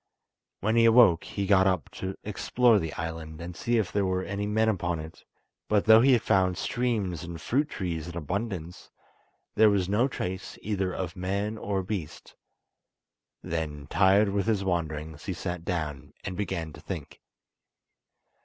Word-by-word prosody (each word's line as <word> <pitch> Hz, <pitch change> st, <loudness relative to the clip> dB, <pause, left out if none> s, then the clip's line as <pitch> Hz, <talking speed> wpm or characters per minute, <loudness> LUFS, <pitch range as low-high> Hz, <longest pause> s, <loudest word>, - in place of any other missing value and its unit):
When 110 Hz, +4 st, +1 dB
he 115 Hz, -, +6 dB
awoke 115 Hz, -7 st, +6 dB
he 100 Hz, -, -3 dB
got 95 Hz, -1 st, +5 dB
up 95 Hz, -4 st, 0 dB
to 95 Hz, 0 st, -5 dB
explore 115 Hz, +2 st, +3 dB
the 80 Hz, -4 st, -3 dB
island, 80 Hz, -1 st, -5 dB
and 85 Hz, +1 st, -7 dB
see 120 Hz, 0 st, 0 dB
if 105 Hz, -5 st, 0 dB
there 100 Hz, -, +1 dB
were 95 Hz, -1 st, 0 dB
any 100 Hz, +1 st, -3 dB
men 110 Hz, +2 st, +2 dB
upon 85 Hz, -6 st, 0 dB
it; 80 Hz, +1 st, -10 dB, 0.4 s
but 105 Hz, -1 st, +2 dB
though 110 Hz, 0 st, +8 dB
he 130 Hz, 0 st, +6 dB
found 95 Hz, -4 st, +2 dB
streams 105 Hz, -9 st, -1 dB
and 85 Hz, -1 st, -7 dB
fruit 145 Hz, -, 0 dB
trees 85 Hz, -, -4 dB
in 85 Hz, 0 st, -6 dB
abundance, 90 Hz, +1 st, -4 dB, 0.6 s
there 110 Hz, 0 st, +6 dB
was 100 Hz, -3 st, +1 dB
no 105 Hz, +7 st, +2 dB
trace 95 Hz, -7 st, -5 dB
either 100 Hz, -3 st, -1 dB
of 90 Hz, -2 st, -4 dB
man 100 Hz, +4 st, -2 dB
or 100 Hz, -3 st, -2 dB
beast. 95 Hz, -5 st, -6 dB, 1.1 s
Then, 75 Hz, -3 st, -4 dB
tired 100 Hz, +1 st, +4 dB
with 100 Hz, +1 st, -1 dB
his 105 Hz, -3 st, +1 dB
wanderings 80 Hz, -4 st, -3 dB
he 95 Hz, -, -2 dB
sat 90 Hz, -1 st, -4 dB
down 75 Hz, -4 st, -4 dB
and 95 Hz, -, -4 dB
began 85 Hz, -5 st, -3 dB
to -, -, -12 dB
think. 85 Hz, -7 st, -7 dB
95 Hz, 165 wpm, -28 LUFS, 85-105 Hz, 1.1 s, though